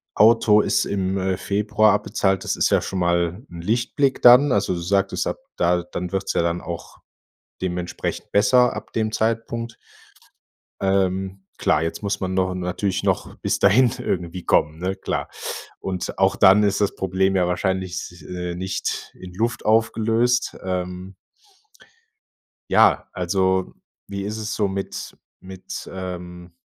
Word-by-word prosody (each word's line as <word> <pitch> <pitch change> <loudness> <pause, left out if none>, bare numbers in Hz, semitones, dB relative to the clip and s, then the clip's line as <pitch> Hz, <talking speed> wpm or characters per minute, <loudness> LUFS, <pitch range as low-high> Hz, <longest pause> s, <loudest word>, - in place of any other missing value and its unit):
Auto 110 -1 +5
ist - - +1
im, 95 -1 -1
äh, 95 -1 -1
Februar 105 +1 +2
abbezahlt. 95 -2 0
Das - - 0
ist - - +2
ja - - +4
schon 95 - -4
mal 85 +4 0
'n 85 -1 -9
Lichtblick 120 +6 0
dann. 125 +3 +8
Also, 100 -2 +1
du 85 - -4
sagtest 100 +2 0
ab, - - -2 0.2
da 90 0 +2
dann 90 +1 -5
wird's 95 0 -1
ja - - +2
dann 85 +1 -1
auch 85 -1 -7 0.7
dementsprechend 90 -1 -4
besser 115 +5 +4
ab - - -8
dem 110 -1 0
Zeitpunkt. 115 +1 -2 1.0
Ähm, 95 0 0 0.2
klar, 75 - +2
jetzt 80 - -4
muss 100 0 -1
man 95 0 -2
no 95 0 +1
natürlich 90 +2 -2
noch - - -1
bis - - -1
dahin 115 +5 +5
irgendwie 90 -7 -3
kommen, 75 +1 +2
ne, 95 +2 -2
klar. - - -3 0.5
Und 95 -2 -4
auch 95 0 +3
dann 100 +1 +6
ist 100 0 +1
das 100 - +1
Problem 95 +1 0
ja 90 -2 +2
wahrscheinlich, 95 -1 -3
äh, 90 -1 -4
nicht 95 +1 -4
in 90 -1 -10
Luft 115 +5 -2
aufgelöst, 115 +2 +2
ähm 90 0 -4 1.6
Ja, - - +4
also, 95 +1 0 0.3
wie 100 -1 -5
ist 105 +2 -4
es 110 0 -4
so 105 -2 +1
mit 95 0 -5 0.2
mit, 95 0 -8
ähm, 90 -2 -7
95 Hz, 150 wpm, -22 LUFS, 90-105 Hz, 1.6 s, dann